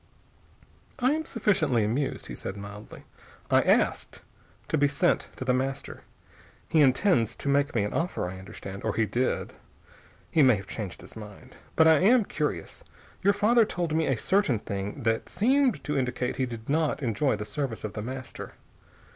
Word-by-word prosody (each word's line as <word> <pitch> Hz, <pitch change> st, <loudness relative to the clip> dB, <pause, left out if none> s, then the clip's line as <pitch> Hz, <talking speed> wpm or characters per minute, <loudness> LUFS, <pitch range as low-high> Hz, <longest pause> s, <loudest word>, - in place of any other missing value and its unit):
"I 255 Hz, +1 st, +2 dB
am 315 Hz, +1 st, -1 dB
sufficiently 200 Hz, -, +1 dB
amused," 130 Hz, +6 st, -2 dB
he -, -, -7 dB
said 95 Hz, -, -6 dB
mildly. 105 Hz, +1 st, -10 dB, 0.5 s
"I -, -, +6 dB
asked -, -, +1 dB, 0.5 s
to -, -, +1 dB
be 145 Hz, -1 st, +4 dB
sent 140 Hz, 0 st, +1 dB
to 130 Hz, -, -6 dB
The 125 Hz, -, +2 dB
Master. 135 Hz, +2 st, -3 dB, 0.7 s
He 160 Hz, -, +3 dB
intends 130 Hz, -, +3 dB
to -, -, -7 dB
make 140 Hz, 0 st, +2 dB
me 110 Hz, -, +2 dB
an 105 Hz, -, -3 dB
offer, 165 Hz, -, -1 dB
I 95 Hz, +1 st, -7 dB
understand. 95 Hz, +1 st, -9 dB
Or -, -, -1 dB
he 115 Hz, -, +2 dB
did. 120 Hz, +5 st, -1 dB, 0.8 s
He 160 Hz, -, +4 dB
may 130 Hz, -4 st, +6 dB
have 95 Hz, -1 st, -7 dB
changed 100 Hz, -2 st, -6 dB
his -, -, -14 dB
mind. 110 Hz, +4 st, -11 dB, 0.2 s
But 160 Hz, -, +6 dB
I 160 Hz, -2 st, +6 dB
am 225 Hz, +3 st, +5 dB
curious. 150 Hz, -, -3 dB, 0.4 s
Your 200 Hz, +2 st, +4 dB
father 220 Hz, +3 st, +4 dB
told 175 Hz, -6 st, -2 dB
me 160 Hz, 0 st, +1 dB
a 135 Hz, -, +1 dB
certain 185 Hz, -, +2 dB
thing 100 Hz, +6 st, -5 dB
that 115 Hz, 0 st, 0 dB
seemed 260 Hz, +5 st, +2 dB
to 150 Hz, -, -2 dB
indicate 125 Hz, -2 st, -1 dB
he 130 Hz, -, 0 dB
did 115 Hz, -2 st, -8 dB
not 155 Hz, 0 st, 0 dB
enjoy 120 Hz, +2 st, +1 dB
the 105 Hz, 0 st, -5 dB
service 120 Hz, +1 st, -4 dB
of 110 Hz, -, -4 dB
The 105 Hz, -, -4 dB
Master. 130 Hz, +3 st, -7 dB
130 Hz, 180 wpm, -27 LUFS, 110-160 Hz, 0.8 s, I